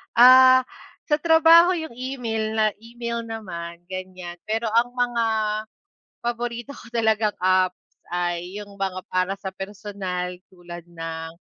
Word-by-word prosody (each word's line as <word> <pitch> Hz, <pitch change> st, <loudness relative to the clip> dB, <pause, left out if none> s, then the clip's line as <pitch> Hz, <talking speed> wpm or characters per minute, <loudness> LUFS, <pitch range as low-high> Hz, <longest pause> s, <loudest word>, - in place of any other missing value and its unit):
Ah, 255 Hz, +2 st, +8 dB, 0.5 s
sa 295 Hz, -, +4 dB
trabaho 330 Hz, +2 st, +6 dB
yung 320 Hz, -5 st, -5 dB
email 230 Hz, -4 st, -3 dB
na 220 Hz, -1 st, +3 dB
email 235 Hz, 0 st, -5 dB
naman 170 Hz, -7 st, -7 dB
ganyan, 185 Hz, -2 st, -7 dB
pero 225 Hz, +1 st, -1 dB
ang 235 Hz, +2 st, +2 dB
mga 245 Hz, -2 st, 0 dB, 1.0 s
paborito 240 Hz, +2 st, -3 dB
ko -, -, -13 dB
talagang 220 Hz, -2 st, +1 dB
apps 185 Hz, 0 st, +2 dB, 0.3 s
ay 175 Hz, +1 st, -2 dB
yung 205 Hz, -1 st, -10 dB
mga 190 Hz, -1 st, -3 dB
para 185 Hz, +1 st, 0 dB
sa 195 Hz, -1 st, -4 dB
personal 190 Hz, -2 st, -5 dB
tulad 175 Hz, -2 st, -10 dB
ng 165 Hz, -1 st, -6 dB
215 Hz, 125 wpm, -23 LUFS, 185-240 Hz, 1.0 s, Ah